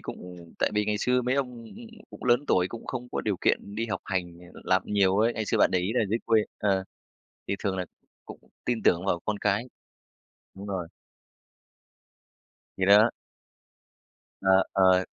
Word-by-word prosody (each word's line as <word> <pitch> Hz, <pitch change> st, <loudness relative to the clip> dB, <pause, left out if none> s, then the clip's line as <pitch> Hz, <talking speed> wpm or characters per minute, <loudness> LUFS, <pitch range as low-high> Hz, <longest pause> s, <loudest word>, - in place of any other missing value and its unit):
cũng 90 Hz, -2 st, -10 dB
tại -, -, +1 dB
vì 105 Hz, 0 st, +2 dB
ngày 105 Hz, 0 st, -1 dB
xưa 125 Hz, +3 st, +1 dB
mấy 125 Hz, +2 st, 0 dB
ông 125 Hz, -4 st, -3 dB, 0.5 s
cũng -, -, -10 dB
lớn 125 Hz, +3 st, +3 dB
tuổi 90 Hz, 0 st, +2 dB
cũng 115 Hz, -, -9 dB
không 125 Hz, -1 st, -5 dB
có -, -, -1 dB
điều 105 Hz, -3 st, -1 dB
kiện 100 Hz, -, 0 dB
đi 115 Hz, +1 st, -1 dB
học 105 Hz, -, -3 dB
hành, 90 Hz, -3 st, -3 dB, 0.2 s
ờ, -, -, -11 dB
làm 95 Hz, 0 st, +2 dB
nhiều 100 Hz, -2 st, +2 dB
ấy, 115 Hz, +2 st, +3 dB
ngày 110 Hz, -, -3 dB
xưa -, -, 0 dB
bạn -, -, +5 dB
để 90 Hz, -, +2 dB
ý 90 Hz, +4 st, -1 dB
là 125 Hz, -, +2 dB
dưới 115 Hz, -, +1 dB
quê, 110 Hz, -2 st, +4 dB, 0.2 s
ờ, 95 Hz, -2 st, +1 dB, 0.6 s
thì 100 Hz, -, 0 dB
thường 95 Hz, -2 st, 0 dB
là 90 Hz, -, -1 dB, 0.4 s
cũng -, -, -10 dB, 0.2 s
tin 120 Hz, -3 st, -1 dB
tưởng 85 Hz, +2 st, +3 dB
vào 85 Hz, -3 st, +1 dB
con 105 Hz, -1 st, -1 dB
cái. 105 Hz, +2 st, +1 dB, 0.9 s
Đúng 100 Hz, +1 st, -9 dB
rồi. 95 Hz, -4 st, -3 dB, 1.9 s
Thì 95 Hz, -, 0 dB
đó. 105 Hz, +4 st, +7 dB, 1.3 s
Ờ, 95 Hz, 0 st, +4 dB
ờ. 95 Hz, -1 st, +4 dB
100 Hz, 180 wpm, -27 LUFS, 95-115 Hz, 1.9 s, đó